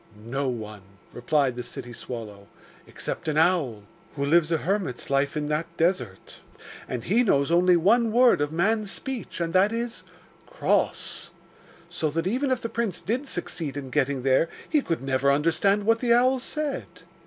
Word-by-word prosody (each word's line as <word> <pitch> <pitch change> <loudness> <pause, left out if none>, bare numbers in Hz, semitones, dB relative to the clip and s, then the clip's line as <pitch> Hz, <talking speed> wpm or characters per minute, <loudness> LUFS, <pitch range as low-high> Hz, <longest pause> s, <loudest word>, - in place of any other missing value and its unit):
'No 135 +4 -2
one,' 110 -4 -6 0.3
replied 130 +1 +1
the 125 - -4
city 120 -1 -8
swallow, 105 -5 -8 0.4
'except - - -4
an 155 -1 0
owl, 155 - +2 0.3
who 140 -1 -1
lives 160 +2 +3
a 165 - +3
hermit's 180 - -2
life 140 +2 +1
in 150 -1 -2
that 150 +2 -1
desert, 165 - -1 0.5
and 125 -3 -4
he 215 +8 +2
knows 140 - +2
only 175 +1 +5
one 225 +7 +3
word 240 -7 +5
of 145 0 0
man's 205 +5 +1
speech, 255 -2 -5
and 165 -1 -2
that 195 +3 +4
is 230 0 -3 0.5
"cross." - - -1 0.6
So 155 - -2
that 165 +3 -2
even 255 +8 0
if 255 -2 0
the - - -2
prince 225 -6 -2
did 250 +7 -2
succeed 165 - -4
in 135 -2 -6
getting 135 0 0
there, 135 +5 +3 0.2
he 305 -2 +2
could 165 - -3
never 135 +1 +2
understand 165 +8 +2
what 225 +2 +3
the 235 -1 +3
owl 255 +2 +3
said. 295 +2 -3
165 Hz, 170 wpm, -25 LUFS, 135-220 Hz, 0.6 s, only